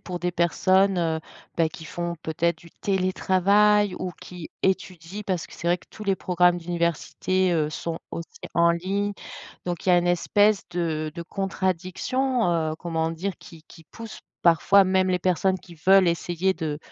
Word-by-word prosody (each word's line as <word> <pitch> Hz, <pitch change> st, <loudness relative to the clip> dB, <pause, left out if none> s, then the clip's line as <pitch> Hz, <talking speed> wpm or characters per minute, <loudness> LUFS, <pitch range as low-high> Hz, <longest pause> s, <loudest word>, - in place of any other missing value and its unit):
pour 180 Hz, -1 st, -6 dB
des 180 Hz, 0 st, -2 dB
personnes, 185 Hz, +2 st, +2 dB
heu, 160 Hz, -2 st, 0 dB, 0.4 s
bah, 165 Hz, -1 st, +3 dB
qui 160 Hz, +1 st, -11 dB
font 170 Hz, +1 st, -4 dB
peut-être 165 Hz, +1 st, -1 dB
du 170 Hz, 0 st, -16 dB
télétravail 195 Hz, +1 st, +2 dB
ou 185 Hz, -, -3 dB
qui, 175 Hz, -3 st, -9 dB
étudient 190 Hz, 0 st, -2 dB
parce 185 Hz, -3 st, -2 dB
que -, -, -14 dB
c'est 170 Hz, -, -7 dB
vrai 175 Hz, +1 st, +3 dB
que -, -, -22 dB
tous 215 Hz, -, -9 dB
les 195 Hz, -1 st, +1 dB
programmes 180 Hz, 0 st, +2 dB
d'université, 175 Hz, +2 st, -1 dB
heu, 155 Hz, -2 st, +1 dB
sont 165 Hz, +1 st, -4 dB
aussi 165 Hz, 0 st, -8 dB
en 170 Hz, 0 st, +5 dB
ligne. 195 Hz, +4 st, -1 dB, 0.5 s
Donc 175 Hz, -1 st, -3 dB
il -, -, +1 dB
y -, -, +6 dB
a 175 Hz, -, +6 dB
une 175 Hz, -, 0 dB
espèce 205 Hz, +4 st, +2 dB
de 160 Hz, -3 st, -2 dB
de 170 Hz, -, -5 dB
contradiction, 195 Hz, +6 st, -1 dB
heu, 160 Hz, -2 st, 0 dB
comment 165 Hz, -2 st, -2 dB
dire, 180 Hz, +4 st, -3 dB
qui 165 Hz, -2 st, -14 dB
qui 165 Hz, -2 st, -15 dB
pousse 225 Hz, +5 st, -10 dB, 0.2 s
parfois, 180 Hz, +3 st, +5 dB
même 185 Hz, 0 st, +2 dB
les 180 Hz, -1 st, +1 dB
personnes 185 Hz, +1 st, +1 dB
qui 175 Hz, -, -15 dB
veulent 190 Hz, -1 st, +7 dB
essayer 175 Hz, +2 st, 0 dB
de 155 Hz, -3 st, -3 dB
175 Hz, 175 wpm, -25 LUFS, 170-190 Hz, 0.5 s, veulent